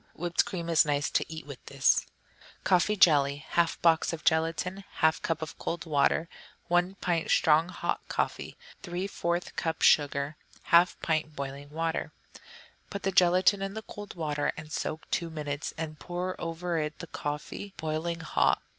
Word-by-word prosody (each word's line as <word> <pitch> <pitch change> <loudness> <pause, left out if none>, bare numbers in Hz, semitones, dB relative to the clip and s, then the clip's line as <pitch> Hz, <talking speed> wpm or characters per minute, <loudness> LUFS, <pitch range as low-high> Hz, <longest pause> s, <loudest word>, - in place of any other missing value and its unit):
Whipped 175 +1 +1
cream 170 -3 -4
is 165 -1 +5
nice 145 -1 0
to - - 0
eat 160 0 -7
with 140 -3 -10
this. - - +2 0.6
Coffee 190 +3 +3
Jelly 145 -5 +4
1/2 170 -1 +2
box 165 -1 +4
of 155 -2 -6
gelatine. 165 +4 +1 0.2
1/2 160 0 +4
cup 165 -1 -1
of 160 - -8
cold 170 +1 -3
water. 155 +1 +2 0.4
1 175 +2 +2
pint 170 -3 -1
strong 160 +2 +4
hot 175 -1 -2
coffee. - - -2 0.2
3/4 175 -1 -2
cup 160 -1 -2
sugar. 145 0 +3 0.3
1/2 175 +1 +6
pint 155 -2 0
boiling 140 0 -6
water. 165 +2 -2 0.8
Put 200 - -6
the 195 - +1
gelatine 185 +2 +4
in 195 +1 -3
the 220 - -5
cold 205 0 -9
water 150 -3 -1
and 155 0 -9
soak 155 - -3
two 170 - 0
minutes, 150 -2 -4
and 155 -2 -5
pour 180 +2 -3
over 165 0 -2
it 150 0 -3
the 170 - -7
coffee, 150 +6 -5
boiling 160 +2 -2
hot. 160 - +2
165 Hz, 160 wpm, -29 LUFS, 155-175 Hz, 0.8 s, 1/2